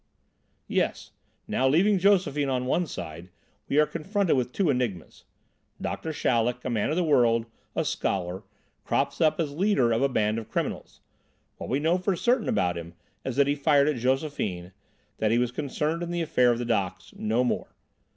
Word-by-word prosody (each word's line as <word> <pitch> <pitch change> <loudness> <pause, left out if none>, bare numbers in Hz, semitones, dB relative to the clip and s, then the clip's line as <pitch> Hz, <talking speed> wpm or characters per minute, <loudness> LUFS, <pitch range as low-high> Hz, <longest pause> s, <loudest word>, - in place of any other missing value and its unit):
"Yes. - - -1 0.4
Now, 130 - +1
leaving 190 +8 +4
Josephine 180 -7 +2
on 125 -1 -1
one 170 +7 +1
side, 85 - -7 0.4
we 140 - +1
are 150 - +6
confronted 190 +3 0
with 125 -2 -1
two 175 +1 +1
enigmas. 120 - -3 0.5
Doctor 160 - -4
Chaleck, 125 -4 0
a 130 - -1
man 110 0 0
of 155 - 0
the 180 - +1
world, 120 -7 +3 0.3
a - - 0
scholar, 95 -1 -2 0.4
crops 140 +4 -1
up 155 0 +3
as 150 -4 -1
leader 165 - +2
of 115 +2 +1
a 140 - +3
band 110 -2 +1
of 110 - -10
criminals. - - -4 0.6
What - - -7
we 135 - +1
know 165 +4 +2
for 185 +1 0
certain 240 +5 +1
about 90 -1 +1
him 85 0 -10 0.3
is 130 - -3
that 140 - +4
he 140 - +1
fired 145 0 +3
at 150 -4 +1
Josephine, 125 - -1 0.5
that 110 - +2
he 115 - +3
was 125 0 +1
concerned 150 +4 -2
in 170 - -3
the 175 -1 -1
affair 125 -6 +3
of 120 - 0
the 120 - -3
docks 100 -6 -2
no 110 +3 0
more. 125 - -2
135 Hz, 185 wpm, -27 LUFS, 115-160 Hz, 0.6 s, are